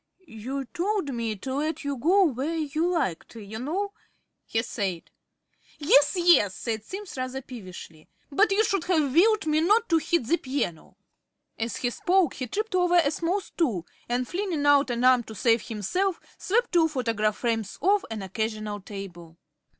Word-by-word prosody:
"You 265 +2 -5
told 360 - -2
me 230 -2 -2
to 260 +7 -6
let 305 +4 -2
you 285 -1 -2
go 355 +10 +4
where 295 0 -1
you 315 +2 -1
liked, 270 - -2
you 220 0 -8
know," 380 - -2 0.5
he 225 0 0
said. 190 -8 -4 0.7
"Yes, 290 -1 +4
yes," 345 - +4
said 220 -3 -3
Simms 390 - -8
rather 255 +1 -3
peevishly, 185 -10 -11 0.2
"but 400 +9 +3
you 410 +3 +3
should 390 -4 -1
have 310 -7 +1
willed 415 +5 +4
me 310 0 +2
not 425 +7 +3
to 330 -2 +4
hit 315 -3 0
the 335 +9 +2
piano." 260 - -4 0.6
As 225 -3 -2
he 245 - -1
spoke 360 +2 +2
he 255 - -5
tripped 430 - -3
over 360 -1 +3
a 325 -5 +4
small 345 +5 -1
stool 235 - -2 0.2
and, 245 +1 0
flinging 350 -6 -2
out 285 -1 +5
an 240 0 -1
arm 255 -1 +6
to 220 - -9
save 225 +2 +2
himself, 345 - -1 0.2
swept 475 +5 0
two 335 -2 +4
photograph 225 -7 -1
frames 225 -4 -2
off 400 +1 +3
an 220 -3 -5
occasional 215 +1 -3
table. 180 -5 -9
275 Hz, 170 wpm, -26 LUFS, 225-350 Hz, 0.7 s, arm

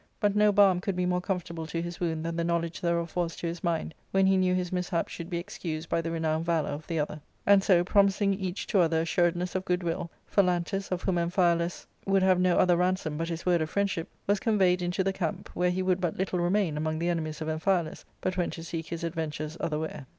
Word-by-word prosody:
But 205 -1 +2
no 210 0 +5
balm 195 -3 +5
could 195 0 -2
be 180 0 0
more 180 0 +1
comfortable 175 -4 -3
to 165 +1 -3
his 175 0 -5
wound 160 -2 -2
than 165 0 -2
the 170 - 0
knowledge 170 0 -1
thereof 170 -1 -1
was 170 -2 -1
to - - -6
his 170 0 -4
mind, 165 -2 -1 0.2
when 195 0 +3
he 190 0 +4
knew 185 -1 +2
his 180 -1 -2
mishap 180 -1 -1
should 170 0 -7
be 175 - -2
excused 170 -3 -5
by 165 - +1
the 165 - -3
renowned 160 -1 0
valour 165 -3 0
of 145 +2 -6
the 165 - -2
other. 150 0 -2 0.2
And 200 -1 +6
so 175 -3 +4
promising 200 +1 +3
each 190 -1 -3
to 200 - +1
other 165 -2 +3
assuredness 175 +2 +1
of 185 - -1
good* 180 -1 0
will, 170 +1 -2 0.2
Phalantus, 190 0 0
of 180 -1 -2
whom 180 -3 +1
Amphialus 170 0 +1 0.2
would 195 -1 +3
have 185 -1 +4
no 180 -1 +3
other 180 -1 +4
ransom 180 -3 0
but 165 +2 -2
his 165 0 -5
word 175 -2 +3
of 155 - -1
friendship, 195 -4 -1 0.2
was 205 0 +2
conveyed 190 -5 +2
into 175 +2 0
the 195 +1 0
camp, 175 -4 -3
where 180 0 +1
he 185 +1 -1
would 185 -1 +1
but 175 -3 -1
little 185 -1 -1
remain 175 -2 +1
among 155 +1 -1
the 170 +2 0
enemies 155 -3 -2
of 155 - -4
Amphialus, 160 +1 0 0.2
but 185 0 -2
went 175 - 0
to 165 - -7
seek 165 -1 -5
his 170 +1 -5
adventures 155 -2 -3
otherwhere. 155 -3 -3
175 Hz, 240 wpm, -28 LUFS, 165-185 Hz, 0.2 s, And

